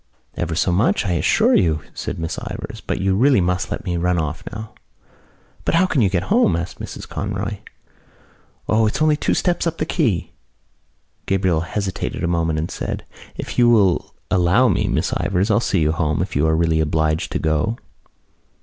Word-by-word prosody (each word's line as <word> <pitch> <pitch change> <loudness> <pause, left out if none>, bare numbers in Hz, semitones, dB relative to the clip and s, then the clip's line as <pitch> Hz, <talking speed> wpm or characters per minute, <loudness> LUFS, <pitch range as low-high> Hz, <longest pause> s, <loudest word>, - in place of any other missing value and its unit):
"Ever 85 -1 -2
so 90 - +1
much, 100 +3 +2
I 95 - 0
assure 85 -3 +3
you," 80 -3 +2
said - - -5
Miss 80 0 -3
Ivors, - - -7
"but - - -3
you 95 0 +1
really 130 +3 +4
must 90 0 0
let - - -5
me 90 -2 -1
run 90 +1 +1
off 80 0 -2
now." 110 0 -8 0.9
"But - - 0
how 180 +3 +5
can 160 -8 +1
you 100 - +3
get 90 -1 0
home?" 90 - +4
asked 85 -1 -4
Mrs - - -7
Conroy. - - -3 1.1
"O, 110 0 +3
it's 105 - -2
only 155 -1 +4
two - - 0
steps 175 -1 0
up 165 0 -2
the - - -1
quay." 115 - 0 1.0
Gabriel 95 -4 +1
hesitated 95 0 -3
a - - +1
moment 80 -2 0
and 80 +2 -3
said: - - -4 0.3
"If - - -4
you 120 -1 +6
will 100 -7 +2 0.2
allow 95 +7 +4
me, 95 - +1
Miss - - 0
Ivors, 95 +3 0
I'll 105 - +4
see 100 -6 0
you 75 0 +2
home 80 -1 0
if 90 0 -7
you 75 +3 +2
are 80 - +2
really 80 -1 +2
obliged 80 0 0
to - - +1
go." 80 +9 0
90 Hz, 190 wpm, -21 LUFS, 80-105 Hz, 1.1 s, you